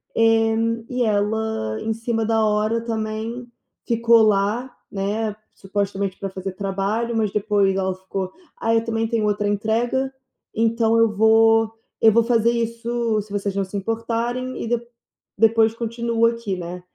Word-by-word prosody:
eh, 225 Hz, 0 st, +3 dB, 0.3 s
e 250 Hz, -1 st, 0 dB
ela 210 Hz, -, 0 dB
em 225 Hz, -, -1 dB
cima 225 Hz, 0 st, -2 dB
da 225 Hz, 0 st, +2 dB
hora, 215 Hz, +2 st, +1 dB
também, 225 Hz, +1 st, -4 dB, 0.4 s
ficou 230 Hz, 0 st, +4 dB
lá, 215 Hz, +5 st, +1 dB, 0.2 s
né, 205 Hz, +2 st, -2 dB, 0.2 s
supostamente 195 Hz, 0 st, -3 dB
para 195 Hz, -, -3 dB
fazer 190 Hz, 0 st, -5 dB
trabalho, 200 Hz, +4 st, -2 dB
mas 215 Hz, -3 st, +1 dB
depois 205 Hz, -2 st, +2 dB
ela 190 Hz, -1 st, -1 dB
ficou: 190 Hz, 0 st, -5 dB, 0.3 s
"Ai, 225 Hz, 0 st, +2 dB
eu 225 Hz, -, +1 dB
também 225 Hz, 0 st, -1 dB
tenho 225 Hz, -2 st, 0 dB
outra 205 Hz, 0 st, 0 dB
entrega, 230 Hz, +6 st, 0 dB, 0.4 s
então 225 Hz, 0 st, +2 dB
eu 230 Hz, -1 st, +4 dB
vou 225 Hz, +1 st, +5 dB, 0.3 s
eu 220 Hz, -, +7 dB
vou 230 Hz, +1 st, +5 dB
fazer 230 Hz, -1 st, +3 dB
isso, 235 Hz, -1 st, -1 dB
se 205 Hz, 0 st, -14 dB
vocês 200 Hz, -1 st, -2 dB
não 200 Hz, -, +1 dB
se 190 Hz, -, -10 dB
importarem, 230 Hz, +4 st, -2 dB
e -, -, -4 dB
de 240 Hz, +1 st, +1 dB, 0.6 s
depois 225 Hz, 0 st, +4 dB
continuo 230 Hz, 0 st, 0 dB
aqui." 230 Hz, -5 st, -2 dB
Né. 175 Hz, +1 st, -6 dB
220 Hz, 150 wpm, -22 LUFS, 205-230 Hz, 0.6 s, eu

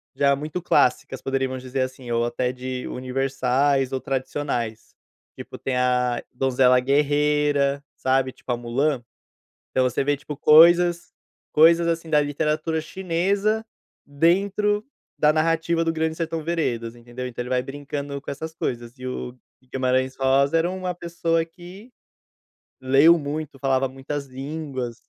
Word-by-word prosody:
já 140 Hz, 0 st, +3 dB
muito 155 Hz, +5 st, -5 dB
clássicas, 130 Hz, -4 st, +1 dB
poderíamos 135 Hz, -1 st, -2 dB
dizer 130 Hz, +1 st, -2 dB
assim, 130 Hz, -2 st, -4 dB
ou 115 Hz, 0 st, +1 dB
até 125 Hz, +1 st, -1 dB
de 130 Hz, 0 st, -5 dB
universais 135 Hz, +1 st, 0 dB
ou 130 Hz, -, -1 dB
tradicionais, 130 Hz, -4 st, -3 dB, 0.4 s
tipo, -, -, -9 dB
tem 135 Hz, -, -3 dB
a 125 Hz, -1 st, +1 dB
Donzela 125 Hz, 0 st, +3 dB
Guerreira, 145 Hz, 0 st, +2 dB
sabe, 130 Hz, 0 st, +1 dB
tipo -, -, -20 dB
a 120 Hz, -, 0 dB
Mulan. 125 Hz, +2 st, -1 dB, 0.7 s
Então 130 Hz, -, +1 dB
você 125 Hz, +2 st, 0 dB
vê 145 Hz, +1 st, +2 dB
tipo 145 Hz, +1 st, -8 dB
coisas 170 Hz, +3 st, +6 dB, 0.4 s
coisas 170 Hz, +2 st, +5 dB
assim, 165 Hz, -1 st, -2 dB
da 150 Hz, -1 st, +5 dB
literatura 150 Hz, +2 st, -1 dB
chinesa 190 Hz, +6 st, 0 dB, 0.4 s
dentro 200 Hz, +8 st, +1 dB, 0.3 s
da 150 Hz, 0 st, +4 dB
narrativa 165 Hz, +1 st, +1 dB
do 165 Hz, -, +1 dB
Grande 160 Hz, 0 st, -1 dB
Sertão 165 Hz, -1 st, -3 dB
Veredas, 120 Hz, -9 st, -2 dB
entendeu? 120 Hz, +2 st, -7 dB
Então, 125 Hz, 0 st, -5 dB
ele 125 Hz, -, -8 dB
vai 125 Hz, -1 st, +1 dB
brincando 140 Hz, +1 st, -5 dB
com -, -, -6 dB
essas 160 Hz, +3 st, -6 dB
coisas 120 Hz, -4 st, -4 dB
e 130 Hz, -, -7 dB
o 125 Hz, 0 st, -5 dB, 0.3 s
Guimarães 130 Hz, 0 st, 0 dB
Rosa 135 Hz, +3 st, +3 dB
era 170 Hz, +2 st, +2 dB
uma 185 Hz, -1 st, -3 dB
pessoa 170 Hz, -1 st, -1 dB
que 185 Hz, +8 st, -13 dB, 0.9 s
leu 140 Hz, +6 st, +5 dB
muito, 145 Hz, -1 st, -5 dB
falava 135 Hz, -1 st, +1 dB
muitas 135 Hz, +2 st, -5 dB
línguas. 135 Hz, -2 st, -5 dB
140 Hz, 140 wpm, -23 LUFS, 130-165 Hz, 0.9 s, coisas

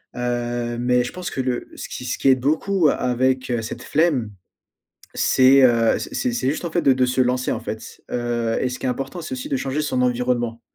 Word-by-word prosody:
heu, 120 Hz, -1 st, -2 dB
mais 125 Hz, 0 st, +2 dB
je -, -, -5 dB
pense 180 Hz, -1 st, -5 dB
que 130 Hz, -, -3 dB
le 125 Hz, -1 st, -2 dB
ce -, -, -7 dB
qui 125 Hz, -, -6 dB
ce 125 Hz, -, -2 dB
qui 135 Hz, -, +2 dB
aide 130 Hz, -1 st, +5 dB
beaucoup 160 Hz, +5 st, +2 dB
a -, -, +3 dB
avec, 130 Hz, +1 st, 0 dB
heu, 120 Hz, -1 st, 0 dB
cette 110 Hz, -, -7 dB
flemme 140 Hz, -9 st, +1 dB, 0.8 s
c'est, 130 Hz, +1 st, +5 dB
heu, 115 Hz, -2 st, +4 dB
c -, -, -7 dB
c'est 250 Hz, -2 st, 0 dB
c'est 185 Hz, -, -1 dB
juste 160 Hz, -, -4 dB
en 170 Hz, -, -3 dB
fait, 175 Hz, -, +1 dB
de 140 Hz, -3 st, +4 dB
de 130 Hz, 0 st, +2 dB
se 130 Hz, +1 st, 0 dB
lancer, 125 Hz, 0 st, +1 dB
en -, -, -3 dB
fait, -, -, -7 dB
heu, 120 Hz, -1 st, -1 dB
et 125 Hz, -, 0 dB
ce 125 Hz, -, -5 dB
qui -, -, -4 dB
est -, -, +1 dB
important 135 Hz, +7 st, -4 dB
c'est 165 Hz, -, -7 dB
aussi 265 Hz, +3 st, -5 dB
de 275 Hz, -, +1 dB
changer 140 Hz, +3 st, -2 dB
son 130 Hz, -4 st, -1 dB
environnement. 120 Hz, -2 st, 0 dB
125 Hz, 240 wpm, -22 LUFS, 120-140 Hz, 0.8 s, aide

